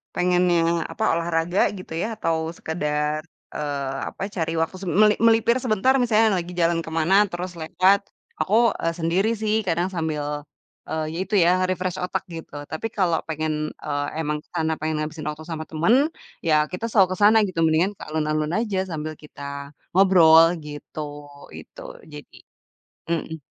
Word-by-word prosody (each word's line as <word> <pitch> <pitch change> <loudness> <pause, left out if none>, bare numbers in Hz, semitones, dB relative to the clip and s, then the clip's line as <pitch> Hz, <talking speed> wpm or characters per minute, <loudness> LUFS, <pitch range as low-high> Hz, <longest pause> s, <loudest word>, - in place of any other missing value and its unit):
pengennya 180 -1 +3 0.3
apa 220 - -4
olahraga 170 +2 0 0.2
gitu 185 -3 -9
ya 175 +6 -1
atau 165 -5 0 0.2
sekedar, 150 -1 -2 0.3
eee, 140 -2 -3
apa, - - -14
cari 165 -2 -1
waktu 165 +3 -2
se - - -6
me 210 +6 +5 0.2
melipir 230 +2 +4
sebentar 245 +2 +2
misalnya 220 -4 +3
lagi 175 +1 -9
jalan 165 0 +2
ke - - -7
mana 165 +4 +2 0.2
terus 180 +1 -4
lewat, 185 +5 +3 0.4
aku, 200 - -1 0.3
eee, 165 0 0
sendiri 180 +6 +1
sih, 215 0 +1
kadang 175 +2 +1
sambil, 155 -3 -2 0.7
eee, 160 0 -2
ya - - -5
itu 200 +3 -3
ya, 175 - +5 0.2
refresh 185 0 -2
otak 190 +1 -2
gitu. 160 -2 -9 0.2
Tapi 160 +8 -3
kalau 175 -5 +2
pengen, 155 -1 -2
eee, 145 -1 -1
emang 150 -1 -1
ke - - -36
sana, 160 -1 +1
pengen 155 0 -2
ngabisin 155 0 -5
waktu 155 +1 -7
sama 160 -2 -4
temen, 230 - +3 0.3
ya 160 -2 +3 0.2
kita 180 +5 -4
selalu 195 -4 +5
ke - - -15
sana 220 +2 +7
gitu, 180 -3 -5
mendingan 165 +6 +2
ke - - -9
alun-alun 155 0 -1
aja 210 -5 -2
sambil 155 -1 -4
kita 140 -1 -8 0.2
ngobrol 170 -4 +7 0.2
gitu. 150 +1 -7 0.5
Itu, 80 - -11 0.3
jadi. 150 0 -12 0.7
Mhm. 160 -2 -3
165 Hz, 165 wpm, -23 LUFS, 155-185 Hz, 0.7 s, sana